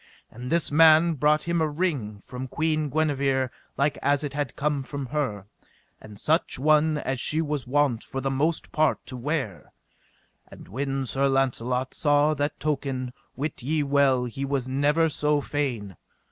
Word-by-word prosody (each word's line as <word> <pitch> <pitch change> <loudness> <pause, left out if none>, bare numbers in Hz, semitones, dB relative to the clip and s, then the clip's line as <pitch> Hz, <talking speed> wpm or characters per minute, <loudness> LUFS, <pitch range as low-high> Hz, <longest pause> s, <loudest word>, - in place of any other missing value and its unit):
And 125 +2 -7
this 170 -3 +2
man 160 +2 +6
brought 150 +1 +2
him 170 -1 0
a 155 - +1
ring 145 - -2
from 125 +4 -7
Queen 155 +1 0
Guenever 135 -3 +1 0.3
like 140 +1 +1
as 145 +1 +2
it 145 -2 -4
had 145 -4 -3
come 145 -1 0
from 140 +1 -5
her, 125 -8 -2 0.6
and 105 -2 -11
such 160 +3 +1
one 155 +2 +3
as 135 -3 -2
she 155 +5 +1
was 150 -5 -2
wont 135 -3 +1
for 135 - -5
the 135 0 -1
most 155 +5 -1
part 155 -1 +1
to 130 - -6
wear; 125 - -3 0.8
and - - -13
when 135 +5 -2
Sir 135 +3 +1
Launcelot 130 -1 0
saw 145 0 +3
that 145 0 -2
token 135 -4 -2 0.2
wit 145 0 -4
ye 150 +4 0
well 140 -3 +3
he 125 +3 -5
was 135 -2 -1
never 145 +5 +2
so 150 -1 +1
fain. 125 -10 -3
140 Hz, 165 wpm, -26 LUFS, 130-150 Hz, 0.8 s, man